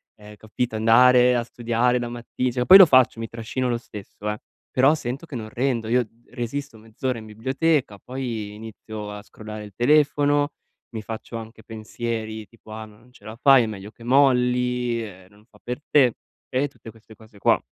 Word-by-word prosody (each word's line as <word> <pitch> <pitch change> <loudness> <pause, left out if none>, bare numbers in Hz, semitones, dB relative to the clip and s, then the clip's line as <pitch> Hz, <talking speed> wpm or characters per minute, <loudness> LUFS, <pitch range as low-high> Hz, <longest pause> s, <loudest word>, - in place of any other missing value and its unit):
ehm, 105 0 -14
capito, 110 +1 -4
andare 125 +2 +5
a 120 - 0
studiare 120 +1 0
la 120 - -3
matti 120 +1 -3
cioè 125 -1 -1
poi 190 - +10
lo 190 - +11
faccio, 130 -4 +4
mi 115 - -4
trascino 120 +3 -3
lo 120 - 0
stesso, 105 -2 -8
eh, 105 - -3 0.3
però 135 +5 +4
sento 135 +3 -5
che 135 - -8
non 110 -2 -6
rendo. 120 -2 -1
Io 120 -1 +2 0.2
resisto 120 +1 -5
mezz'ora 115 +3 -4
in 110 - -11
biblioteca, 130 +1 -1
poi 120 -5 -5
inizio 110 -1 -8
a 105 0 -8
scrollare 110 0 -9
il 100 - -13
telefono, 145 +2 +3 0.4
mi 110 - -4
faccio 110 +1 -8
anche 110 0 -10
pensieri 110 -1 -5
tipo: 115 -2 -17
"Ah, 110 0 -7
non 110 +4 -19
ce 105 - -20
la 110 +1 -8
fai, 135 -1 +6
è - - -1
meglio 105 0 -8
che 115 - -17
molli, 125 -2 +2
ehm, 95 -3 -11
non 105 +1 -23
fa 105 -3 -23
per 125 +3 -5
te", 130 -5 +5 0.4
e 135 +3 0
tutte 115 - -13
queste 110 0 -18
cose 110 -2 -18
qua. - - +2
115 Hz, 190 wpm, -23 LUFS, 110-125 Hz, 0.4 s, lo